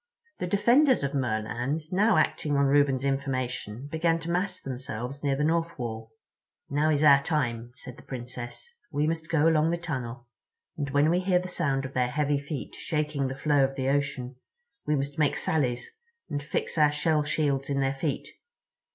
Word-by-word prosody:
The 180 Hz, -, -2 dB
defenders 235 Hz, -, +4 dB
of 140 Hz, +1 st, -1 dB
Merland, 120 Hz, +3 st, -1 dB
now 205 Hz, +3 st, +4 dB
acting 145 Hz, -2 st, +1 dB
on 140 Hz, -, +4 dB
Reuben's 140 Hz, -1 st, +3 dB
information, 130 Hz, -4 st, -2 dB
began 165 Hz, +1 st, +2 dB
to 165 Hz, +1 st, -4 dB
mass 180 Hz, +3 st, -1 dB
themselves 130 Hz, +1 st, -5 dB
near 140 Hz, -1 st, +2 dB
the 145 Hz, -, -1 dB
North 165 Hz, +2 st, 0 dB
Wall. 110 Hz, -3 st, -5 dB, 0.6 s
"Now 150 Hz, +2 st, +2 dB
is 150 Hz, -1 st, +2 dB
our 140 Hz, -2 st, +7 dB
time," 120 Hz, -6 st, -1 dB
said 130 Hz, -1 st, -10 dB
the -, -, -12 dB
Princess. 120 Hz, -, -7 dB, 0.2 s
"We 145 Hz, 0 st, +1 dB
must 160 Hz, 0 st, -2 dB
go 160 Hz, -1 st, +3 dB
along 160 Hz, -1 st, +4 dB
the 170 Hz, -, 0 dB
tunnel, 130 Hz, -8 st, -5 dB, 0.5 s
and 145 Hz, -2 st, -3 dB
when 145 Hz, +3 st, +3 dB
we 175 Hz, -, +3 dB
hear 185 Hz, -1 st, +2 dB
the 180 Hz, +1 st, -2 dB
sound 140 Hz, -7 st, -1 dB
of 135 Hz, -, -7 dB
their 125 Hz, -1 st, +1 dB
heavy 145 Hz, +1 st, +1 dB
feet 140 Hz, -1 st, -6 dB
shaking 150 Hz, -3 st, -1 dB
the 130 Hz, -, -4 dB
flow 145 Hz, 0 st, +3 dB
of 135 Hz, +1 st, -1 dB
ocean 135 Hz, -2 st, -1 dB, 0.5 s
we 150 Hz, -, +3 dB
must 140 Hz, +1 st, -3 dB
make 150 Hz, -2 st, +2 dB
sallies, 125 Hz, -6 st, -1 dB, 0.4 s
and 145 Hz, -, -1 dB
fix 150 Hz, +2 st, -2 dB
our 150 Hz, -1 st, +6 dB
shell 150 Hz, +1 st, +1 dB
shields 145 Hz, -2 st, 0 dB
in 140 Hz, -1 st, 0 dB
their 135 Hz, 0 st, +1 dB
feet. 140 Hz, +1 st, -2 dB
140 Hz, 180 wpm, -27 LUFS, 130-155 Hz, 0.6 s, our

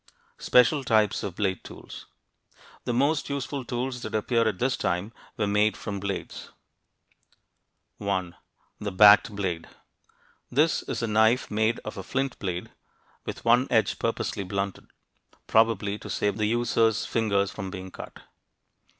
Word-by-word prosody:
SPECIAL 135 Hz, +3 st, +4 dB
TYPES 110 Hz, -4 st, +2 dB
OF 95 Hz, -4 st, -5 dB
BLADE 95 Hz, -3 st, -1 dB
TOOLS -, -, -11 dB, 0.8 s
The 120 Hz, -, -1 dB
most 140 Hz, +4 st, +1 dB
useful 140 Hz, -1 st, -3 dB
tools 125 Hz, +1 st, -3 dB
that -, -, -5 dB
appear 115 Hz, +1 st, +1 dB
at 105 Hz, -4 st, -1 dB
this 125 Hz, +4 st, +1 dB
time 90 Hz, +6 st, -2 dB, 0.2 s
were 105 Hz, -, +1 dB
made 105 Hz, +1 st, +2 dB
from 100 Hz, -1 st, -5 dB
blades. 100 Hz, 0 st, -5 dB, 1.5 s
1. 95 Hz, -4 st, -2 dB, 0.4 s
The 105 Hz, -1 st, -3 dB
"backed" 105 Hz, +2 st, +7 dB
blade. 90 Hz, -5 st, -3 dB, 0.8 s
This 150 Hz, +6 st, +2 dB
is -, -, -4 dB
a -, -, 0 dB
knife 110 Hz, +3 st, +3 dB
made 110 Hz, +2 st, +1 dB
of 110 Hz, -, -6 dB
a -, -, -5 dB
flint 135 Hz, +5 st, -2 dB
blade, 90 Hz, -3 st, -4 dB, 0.5 s
with -, -, -6 dB
one 120 Hz, +3 st, +4 dB
edge 110 Hz, -4 st, +2 dB
purposely 110 Hz, -3 st, -2 dB
blunted, 100 Hz, +1 st, -4 dB, 0.6 s
probably 105 Hz, -2 st, +2 dB
to -, -, -9 dB
save 105 Hz, 0 st, -1 dB
the 105 Hz, -1 st, +1 dB
user's 115 Hz, -1 st, +2 dB
fingers 100 Hz, -4 st, +1 dB
from 95 Hz, -3 st, -6 dB
being 95 Hz, 0 st, -7 dB
cut. -, -, -10 dB
110 Hz, 140 wpm, -26 LUFS, 100-120 Hz, 1.5 s, backed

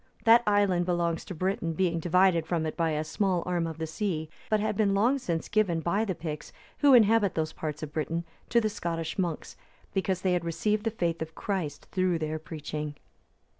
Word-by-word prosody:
That 230 Hz, +1 st, +7 dB
island 200 Hz, -4 st, +3 dB
belongs 170 Hz, -2 st, 0 dB
to 185 Hz, -, -7 dB
Britain, 175 Hz, -1 st, -1 dB
being 170 Hz, 0 st, +1 dB
divided 175 Hz, -1 st, +3 dB
from 165 Hz, -2 st, 0 dB
it 155 Hz, -, -3 dB
by 165 Hz, -2 st, +1 dB
a 155 Hz, 0 st, -1 dB
small 180 Hz, +2 st, 0 dB
arm 175 Hz, -2 st, 0 dB
of 160 Hz, -1 st, -6 dB
the 160 Hz, -, -2 dB
sea, 160 Hz, -2 st, -3 dB, 0.2 s
but 215 Hz, -, +3 dB
had 210 Hz, 0 st, -1 dB
been 200 Hz, -1 st, +2 dB
long 240 Hz, +8 st, +3 dB
since 170 Hz, -10 st, -2 dB
given 205 Hz, -6 st, +2 dB
by 195 Hz, +7 st, 0 dB
the 190 Hz, -4 st, -2 dB
Picts, 155 Hz, -3 st, -6 dB, 0.3 s
who 285 Hz, -3 st, +7 dB
inhabit 220 Hz, -3 st, +4 dB
those 155 Hz, -1 st, -1 dB
parts 155 Hz, -1 st, -5 dB
of 150 Hz, -1 st, -6 dB
Britain, 165 Hz, +2 st, -2 dB, 0.3 s
to 235 Hz, -, +4 dB
the 220 Hz, -, +1 dB
Scottish 165 Hz, -4 st, -3 dB
monks, 170 Hz, -4 st, -2 dB, 0.4 s
because 190 Hz, -1 st, 0 dB
they 185 Hz, -1 st, +2 dB
had 175 Hz, -1 st, 0 dB
received 210 Hz, +6 st, -1 dB
the -, -, +3 dB
faith 170 Hz, -7 st, -2 dB
of 160 Hz, 0 st, -5 dB
Christ 170 Hz, -8 st, -3 dB
through 185 Hz, -3 st, +1 dB
their 155 Hz, 0 st, -3 dB
preaching. 150 Hz, -1 st, -5 dB
175 Hz, 205 wpm, -28 LUFS, 160-200 Hz, 0.4 s, That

